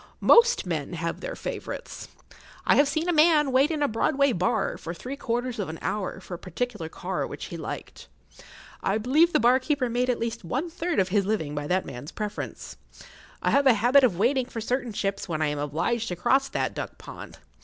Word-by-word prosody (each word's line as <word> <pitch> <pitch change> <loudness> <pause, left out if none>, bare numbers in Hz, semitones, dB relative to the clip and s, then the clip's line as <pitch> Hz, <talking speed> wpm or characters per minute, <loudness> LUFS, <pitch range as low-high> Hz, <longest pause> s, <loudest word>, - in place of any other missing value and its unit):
Most 475 - +5
men 160 -3 -3
have 170 0 -3
their - - -5
favourites. - - -6 0.6
I - - +5
have 285 - +5
seen 315 +4 -1
a 355 - +2
man 305 -3 +5
wait 265 +3 +4
in 310 -3 -1
a - - +3
Broadway 270 +4 +2
bar 180 -5 0
for 170 +1 -6
three 255 +10 -6
quarters 245 -2 -2
of 195 - -2
an 160 - -6
hour 195 -2 -3
for 185 - -10
a 175 - -5
particular 200 -2 -4
car - - -3
which - - -7
he - - -7
liked. - - -7 0.7
I 195 - +1
believe 290 +10 +3
the - - +3
bar 245 +3 +5
keeper 265 -2 0
made 245 +2 0
at 250 - +2
least 230 -2 -3
one 270 - -3
third 345 0 -2
of 190 -1 +2
his 200 0 +1
living 180 -9 -1
by 145 0 -3
that 185 +2 +1
man's 125 +4 -8
preference. 210 0 -6 0.7
I - - +2
have 280 0 +4
a 250 - +7
habit 245 +6 +5
of 215 -9 +3
waiting 250 +5 +2
for 235 - -6
certain 245 +2 -2
ships 195 -2 -3
when 155 -2 -1
I 150 - +1
am 145 0 -3
obliged 165 +11 -1
to 180 - -3
cross 270 +10 +2
that - - -1
duck - - -6
pond. - - -10
235 Hz, 215 wpm, -26 LUFS, 185-275 Hz, 0.7 s, a